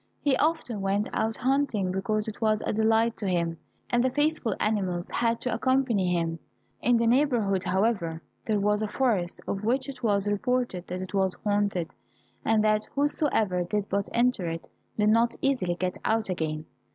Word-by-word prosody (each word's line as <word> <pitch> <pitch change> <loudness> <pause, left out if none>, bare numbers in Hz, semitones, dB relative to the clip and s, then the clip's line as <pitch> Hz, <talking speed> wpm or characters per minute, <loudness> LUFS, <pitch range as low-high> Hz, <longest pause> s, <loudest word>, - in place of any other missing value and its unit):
He 285 -3 +2
often 300 -9 0
went 195 +2 0
out 220 0 0
hunting 255 -8 +1
because 210 +3 -1
it 220 - -7
was 215 -1 +2
a - - -1
delight 225 +1 +2
to 205 - -3
him, 170 -2 0 0.3
and 240 0 +2
the 260 - +3
faithful 290 -5 0
animals 190 -5 0
had 230 -1 0
to 250 - -1
accompany 255 -8 +1
him. 165 -1 -1 0.4
In 245 -1 +4
the 230 - +1
neighborhood, 230 -7 +2
however, 185 -4 0 0.2
there 215 -2 +2
was 210 +1 +1
a 215 - 0
forest 210 -8 0
of 195 +1 -3
which 255 +4 +1
it 275 -2 -8
was 205 -4 +1
reported 205 -3 -1
that 180 +1 -4
it 185 - -9
was 190 -2 +1
haunted, 205 -4 0 0.5
and 220 -1 +3
that 215 0 +2
whosoever 270 - +1
did 205 +3 -2
but 200 +1 -1
enter 240 -7 +1
it 165 0 -6 0.3
did 210 0 +3
not 230 +2 +3
easily 250 -11 0
get 180 0 -3
out 220 -1 +1
again. 155 -3 -2
215 Hz, 175 wpm, -27 LUFS, 185-240 Hz, 0.5 s, In